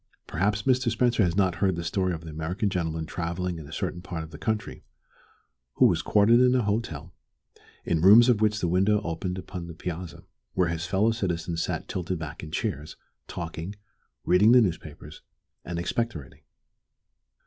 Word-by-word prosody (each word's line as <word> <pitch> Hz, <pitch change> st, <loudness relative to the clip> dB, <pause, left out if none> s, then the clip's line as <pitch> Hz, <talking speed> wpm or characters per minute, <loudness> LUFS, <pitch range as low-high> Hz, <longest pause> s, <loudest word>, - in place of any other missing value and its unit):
Perhaps 105 Hz, +5 st, 0 dB
Mr. 130 Hz, -2 st, +2 dB
Spencer 115 Hz, 0 st, +2 dB
has 85 Hz, -2 st, 0 dB
not 95 Hz, -3 st, +2 dB
heard 95 Hz, 0 st, +1 dB
the 85 Hz, -, -4 dB
story 95 Hz, +2 st, 0 dB
of 80 Hz, -2 st, -4 dB
the 80 Hz, -1 st, -9 dB
American 85 Hz, +6 st, -2 dB
gentleman 80 Hz, -3 st, -2 dB
travelling 85 Hz, +1 st, -3 dB
in 75 Hz, -, -10 dB
a -, -, -12 dB
certain 85 Hz, +2 st, -3 dB
part 85 Hz, -3 st, -5 dB
of 80 Hz, -, -11 dB
the -, -, -10 dB
country, 110 Hz, -2 st, -3 dB, 0.9 s
who -, -, +5 dB
was -, -, +3 dB
quartered 110 Hz, +3 st, +4 dB
in 125 Hz, 0 st, +4 dB
a 125 Hz, -, +2 dB
hotel, 90 Hz, -7 st, -3 dB, 0.7 s
in 80 Hz, -, +1 dB
a -, -, -3 dB
room 100 Hz, +6 st, +9 dB
of 120 Hz, -3 st, +3 dB
which 105 Hz, -1 st, +2 dB
the 85 Hz, -, +1 dB
window 95 Hz, +4 st, +3 dB
opened 90 Hz, +2 st, -3 dB
upon 90 Hz, -2 st, -7 dB
the 85 Hz, -, -9 dB
piazza 85 Hz, -2 st, -6 dB, 0.3 s
where 90 Hz, -2 st, +2 dB
his 85 Hz, 0 st, -3 dB
fellow 100 Hz, +4 st, +2 dB
citizens 85 Hz, -6 st, -2 dB
sat -, -, -3 dB
tilted 90 Hz, 0 st, -3 dB
back 80 Hz, -1 st, -7 dB
in 75 Hz, -, -8 dB
chairs, 75 Hz, 0 st, -3 dB, 0.3 s
talking, 85 Hz, +3 st, -6 dB, 0.5 s
reading 105 Hz, +6 st, +5 dB
the 125 Hz, -, +8 dB
newspapers, 80 Hz, -5 st, -4 dB, 0.4 s
and 85 Hz, -1 st, -5 dB
expectorating. 85 Hz, -, -3 dB
90 Hz, 180 wpm, -26 LUFS, 80-105 Hz, 0.9 s, room